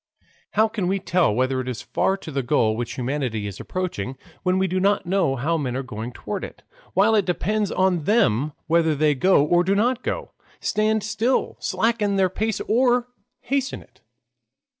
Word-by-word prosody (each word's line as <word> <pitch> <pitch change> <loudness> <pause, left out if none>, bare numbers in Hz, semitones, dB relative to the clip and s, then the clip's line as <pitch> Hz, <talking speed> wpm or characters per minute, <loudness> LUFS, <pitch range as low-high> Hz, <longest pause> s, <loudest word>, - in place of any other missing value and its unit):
How 220 +2 +4
can 215 -5 -3
we 195 +2 +1
tell 180 - +2
whether 130 +3 0
it 130 - -7
is 125 -3 -4
far 195 - 0
to 175 -5 -9
the 140 -1 -1
goal 120 -4 +2
which 120 0 -4
humanity 125 -4 -2
is 100 -1 -6
approaching, 135 - -4 0.2
when 185 0 +1
we 190 - +2
do 185 0 -1
not 200 +2 +2
know 180 -6 +1
how 155 +6 0
men 130 -4 -2
are 135 - -3
going 120 -2 -6
toward - - -5
it, - - -9 0.3
while 205 +4 +4
it 210 -2 +4
depends 205 +3 -1
on 185 -4 +1
them 150 - +2
whether 160 -1 +2
they 150 +1 +3
go 145 +1 +4
or 175 +3 +3
do 195 +2 +1
not 240 +4 +1
go, - - -4 0.3
stand 215 0 +1
still, 220 +4 0
slacken 210 +1 0
their 190 -1 +3
pace 220 +3 -2
or 245 +1 +2 0.3
hasten 275 +1 -2
it? - - -29
185 Hz, 185 wpm, -23 LUFS, 135-210 Hz, 0.3 s, How